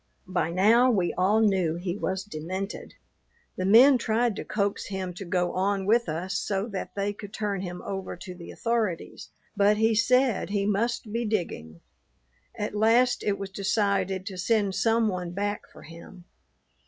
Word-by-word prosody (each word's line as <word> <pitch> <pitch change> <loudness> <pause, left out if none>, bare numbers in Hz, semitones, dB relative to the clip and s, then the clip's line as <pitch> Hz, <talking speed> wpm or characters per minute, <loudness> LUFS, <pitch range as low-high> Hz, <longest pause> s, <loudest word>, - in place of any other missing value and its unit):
By 180 -3 -1
now 220 +8 +4
we 190 -7 +1
all 195 +5 +2
knew 190 -6 +2
he 175 +1 -3
was 190 -2 -2
demented. 190 +2 -6 0.6
The 185 - -2
men 250 +6 +7
tried 230 0 +1
to - - -4
coax 200 -1 -2
him 190 -2 -4
to 190 +3 -8
go 180 0 0
on 195 +1 0
with 230 0 +2
us 180 +5 -2
so 195 0 -1
that 190 -3 -6
they 200 0 -1
could 205 0 -10
turn 205 -3 -2
him 180 -1 -6
over 195 -1 -5
to 180 +1 -8
the 175 -1 -11
authorities, 225 -7 -2 0.3
but 205 +1 +4
he 225 +1 +3
said 250 +1 +2
he 200 -1 0
must 215 +1 -1
be 235 +1 0
digging. 165 - -3 0.7
At 210 - -3
last 230 +4 +3
it 200 -1 0
was 195 -1 -6
decided 195 -1 0
to 190 -3 -6
send 200 0 +1
some 225 +2 +2
one 180 -3 -3
back 205 +2 -3
for - - -14
him. 170 +3 -12
200 Hz, 170 wpm, -26 LUFS, 185-220 Hz, 0.7 s, men